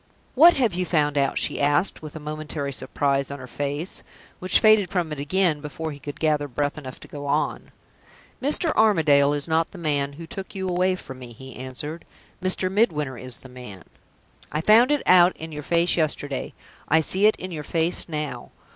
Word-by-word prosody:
"What 335 +6 +7
have 240 -8 +1
you 180 +1 -1
found 150 -4 +1
out?" 140 -1 +1
she - - -1
asked, 145 +6 +2
with 155 -1 -9
a - - -6
momentary 150 -2 -5
surprise 140 0 -1
on 140 - -6
her 130 - -9
face, 145 +7 -4 0.4
which 185 - +2
faded 215 -4 +5
from 175 -5 -1
it 150 - -5
again 160 +1 +1
before 155 +2 -5
he 145 - -10
could 145 +1 -8
gather 150 -2 +1
breath 145 +2 -2
enough 135 -4 -9
to - - -12
go 145 -1 -7
on. 145 +2 -1 0.7
"Mr. 300 +4 +2
Armadale 155 -10 +4
is 145 0 -2
not 160 0 +1
the - - -12
man 145 -4 -1
who 165 +3 -9
took 190 +4 -8
you 190 -1 -3
away 185 +1 +1
from 130 -7 -10
me," 120 -2 -10
he 130 +2 -11
answered. 130 +6 -6 0.4
"Mr. 185 0 +1
Midwinter 155 - +1
is 130 -2 -8
the - - -14
man. 125 -8 -11 0.7
I 150 - -1
found 225 - +6
it 295 -1 +1
out 180 0 +6
in 160 0 -8
your 150 -1 -6
face 170 +3 +1
yesterday. 145 -4 -2 0.3
I 160 - +4
see 190 +6 +2
it 215 - +3
in 185 - -7
your 155 -3 -5
face 165 +4 0
now. 150 -2 -4
155 Hz, 200 wpm, -24 LUFS, 140-180 Hz, 0.7 s, What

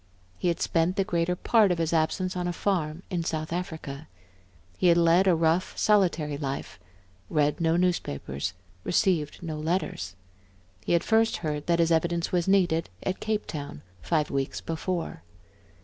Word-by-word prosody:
He - - 0
had 170 -1 +1
spent 170 +2 +1
the 195 - +2
greater 175 -1 0
part 210 +1 +3
of 175 - +1
his 165 0 0
absence 180 +4 0
on 180 -1 -2
a 175 - -1
farm 170 -3 -1
in 175 -2 -1
South 155 0 -3
Africa; 160 -4 -5 0.7
he 180 - +2
had 170 -1 +6
led 170 +3 +4
a 180 - +5
rough, 165 +2 +1
solitary 170 -8 +2
life, 140 -2 -4 0.5
read 150 0 +1
no 165 0 +3
newspapers, 95 - -1 0.3
received 175 -5 +1
no 155 -2 -4
letters. 170 - -2 0.7
He - - 0
had 170 -1 +3
first 225 0 +3
heard 150 -1 -3
that 170 -1 +3
his 170 0 +2
evidence 170 +1 +1
was 175 -1 +1
needed 180 - +2
at 185 - -2
Cape 215 -1 -1
town, 145 - -7 0.2
five 155 -3 0
weeks 135 -1 -2
before. 165 - -3
170 Hz, 165 wpm, -27 LUFS, 155-180 Hz, 0.7 s, had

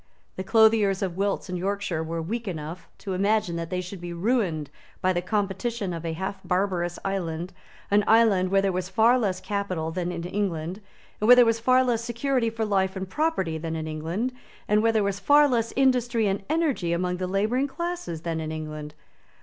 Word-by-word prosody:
The 190 - -4
clothiers 215 -2 +4
of 180 -3 -2
Wilts 200 +1 -1
and 180 - -4
Yorkshire 195 -3 -2
were 165 0 -3
weak 225 +6 -4
enough 165 0 -6
to 195 - -5
imagine 200 -1 +1
that 165 -1 -4
they 180 -1 -2
should 185 0 -8
be 175 0 -5
ruined 175 - 0 0.3
by 185 0 +2
the 175 - 0
competition 205 +1 -2
of 165 -1 -5
a 165 -1 -2
half 190 +3 -4
barbarous 180 -2 0
island, 175 -3 -3 0.4
an 205 +1 +4
island 215 -5 +4
where 195 +1 +3
there 195 - +2
was 180 0 -3
far 225 +6 +4
less 190 -5 -1
capital 185 -4 -3
than 180 +1 -2
in 170 -1 -5
England, 180 -1 -3 0.4
where 230 +4 +7
there 245 -1 +7
was 230 0 +2
far 255 +2 +4
less 235 -2 0
security 235 +1 0
for 225 0 -2
life 190 -2 +1
and 190 0 -5
property 190 - 0
than 160 0 -4
in 160 -1 -3
England, 165 +11 -3 0.3
and 210 0 +3
where 225 +1 +3
there 220 -2 +2
was 200 0 -1
far 290 +5 +5
less 230 -4 0
industry 245 -4 +2
and 195 0 0
energy 295 - +1
among 180 +1 -1
the 185 0 -2
labouring 215 +8 +1
classes 340 - -4
than 165 -1 -2
in 155 -1 -4
England. 155 -1 -6
195 Hz, 200 wpm, -26 LUFS, 175-225 Hz, 0.4 s, where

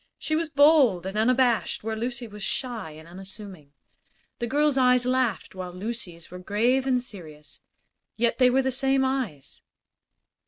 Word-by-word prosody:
She 310 - -2
was 325 0 -1
bold 280 - +4
and 190 +2 -5
unabashed 240 +1 +1
where 220 0 -3
Lucy 240 +1 -4
was 210 -1 -11
shy 235 - -3
and 155 +1 -13
unassuming. 190 -4 -11 0.7
This 235 -1 -3
girl's 295 +1 +2
eyes 250 -1 +3
laughed, 255 -4 0
while 185 -1 -6
Lucy's 180 -4 -7
were 180 - -8
grave 240 +8 +1
and 255 -1 +2
serious; 160 -11 -10 0.5
yet 235 +3 0
they 255 -1 +6
were 265 +2 +2
the 265 - 0
same 270 +1 +2
eyes. 245 - -3
235 Hz, 155 wpm, -25 LUFS, 190-260 Hz, 0.7 s, they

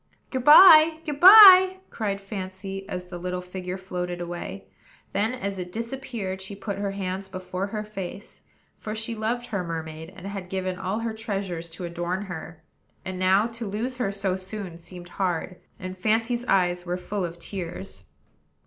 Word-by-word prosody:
"Good 260 -2 -2
by! 315 +1 +9
good 295 -3 -4
by!" 375 -1 +10
cried 200 -3 -2
Fancy, 195 0 -7
as 180 0 -5
the 175 -1 -7
little 180 +1 -3
figure 180 0 -6
floated 180 -2 -5
away; 170 - -6 0.5
then, 220 +5 0
as 200 -6 -4
it 180 0 -6
disappeared, 230 -4 -5
she 195 +1 -7
put 200 0 -5
her 200 0 -1
hands 195 0 -4
before 185 0 -5
her 210 +1 -4
face, 200 -1 -8 0.3
for 215 0 -6
she 225 +1 -4
loved 230 +2 -2
her 200 -6 -3
mermaid, 160 -1 -6
and 190 - -11
had 195 -2 -6
given 185 -1 -3
all 195 +4 -2
her 230 -1 -3
treasures 195 -6 -4
to 170 +3 -8
adorn 175 +3 -3
her; 165 -3 -8 0.4
and 185 -1 -5
now 190 +3 +4
to 230 -1 -6
lose 230 +6 -3
her 220 -6 -1
so 195 -2 -2
soon 190 -1 -7
seemed 175 +1 -11
hard, 180 0 -1 0.2
and 185 0 -7
Fancy's 225 +5 0
eyes 180 -4 +1
were 175 0 -3
full 195 +2 -4
of 170 -1 -5
tears. 170 - -7
195 Hz, 170 wpm, -25 LUFS, 180-220 Hz, 0.5 s, by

